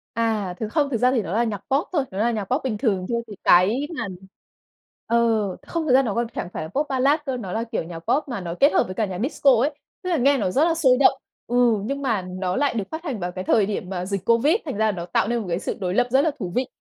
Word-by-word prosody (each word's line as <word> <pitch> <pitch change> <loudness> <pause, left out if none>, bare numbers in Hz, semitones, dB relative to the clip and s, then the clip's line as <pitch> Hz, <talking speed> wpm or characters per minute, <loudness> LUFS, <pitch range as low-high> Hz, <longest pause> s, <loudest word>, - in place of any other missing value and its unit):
À, 220 -5 0
thực 220 - -2
không 290 -3 +1
thực 235 - 0
ra 250 +3 +3
thì 245 -4 +1
nó 185 -1 -5
là 235 +2 +2
nhạc 215 -3 -2
Pop 270 - -1
thôi, 290 -5 +2
nó 190 - -7
là 235 +2 +2
nhạc 215 -3 -2
Pop 255 +9 -1
bình 225 -5 -2
thường 195 -6 0
chưa 235 - 0
thì 205 - -9
cái 215 +11 +4
mà 225 - -2 1.0
ờ, 235 - +1 0.5
không 335 -2 -2
thật 255 - +3
ra 265 - +7
nó 215 -5 -2
còn 235 0 0
chẳng - - -4
phải - - -4
là 160 - -7
Pop 290 - -1
Ballad 275 +4 +2
cơ, 260 -2 -2
nó 190 -6 -6
là, 225 +3 -1
kiểu, 230 - -3
nhạc 165 0 -8
Pop 280 - 0
mà 235 -7 -4
nó 170 -1 -5
kết 285 - +5
hợp - - +4
với 185 - -7
cả 220 - +1
nhạc 185 -1 -5
Disco 275 0 +3
ấy. 290 +3 +2 0.3
Tức 365 - -3
là 335 - +2
nghe 280 +2 +3
nó 190 -5 0
rất 285 +8 +3
là 335 - +2
sôi 260 -6 +4
động, 275 - +4 0.3
ừ, 245 - -2 0.3
nhưng 280 +3 -3
mà 225 -8 0
nó 185 0 -3
lại 285 -3 +1
được 215 -4 -1
phát 320 +2 -5
hành 265 - -4
vào 175 0 -3
cái 185 +1 -5
thời 205 +1 +3
điểm 195 -3 -4
mà 180 -1 -3
dịch 195 -1 -3
Covid, 235 - +4
thành 275 -8 -4
ra 220 - +2
là 215 - +3
nó 175 -3 -5
tạo 180 - 0
nên 235 0 0
một 210 - -5
cái 170 +2 -1
sự - - -4
đối 180 -1 -2
lập 245 +3 +2
rất 270 +1 +5
là 320 - +2
thú 180 -4 -4
vị. 255 0 0
230 Hz, 305 wpm, -23 LUFS, 190-270 Hz, 1.0 s, ra